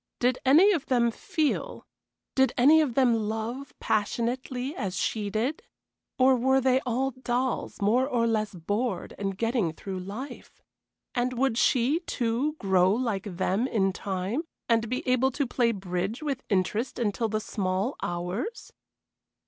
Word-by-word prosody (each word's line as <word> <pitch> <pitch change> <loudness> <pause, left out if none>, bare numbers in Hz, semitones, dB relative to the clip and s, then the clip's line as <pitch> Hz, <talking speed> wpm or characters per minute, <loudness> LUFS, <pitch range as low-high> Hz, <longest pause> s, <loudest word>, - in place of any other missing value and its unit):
Did 250 +1 +2
any 320 +10 +6
of 330 -8 -1
them 240 -2 +3
feel 315 - -2 0.5
did 265 -2 +3
any 295 +6 +7
of 270 -7 -1
them 255 -3 +4 0.2
love 230 +5 -4
passionately 245 +6 -1
as 190 - -3
she 210 -2 -1
did? 230 +9 -1 0.6
or 260 0 +5
were 265 +2 +3
they 260 0 +3
all 260 +3 0
dolls 255 0 -2
more 245 +6 +3
or 240 -4 +1
less 215 -3 0
bored 205 +8 -2
and 195 -1 -2
getting 225 -6 0
through 190 +3 -6
life? 205 +10 -8 0.5
And 250 +1 0
would 255 -1 +1
she, 255 +6 +3
too, 255 -2 -1
grow 190 - +3
like 210 -5 -2
them 195 +6 +1
in 195 -6 +1
time, 195 +8 -2 0.3
and 230 -1 +2
be 255 +1 -3
able 255 +1 +3
to 280 - 0
play 240 -1 +1
bridge 195 - -3
with 275 -3 -2
interest 210 +5 0
until 225 -1 0
the 215 0 0
small 195 +3 -2
hours? 180 - -4
235 Hz, 150 wpm, -27 LUFS, 205-260 Hz, 0.6 s, any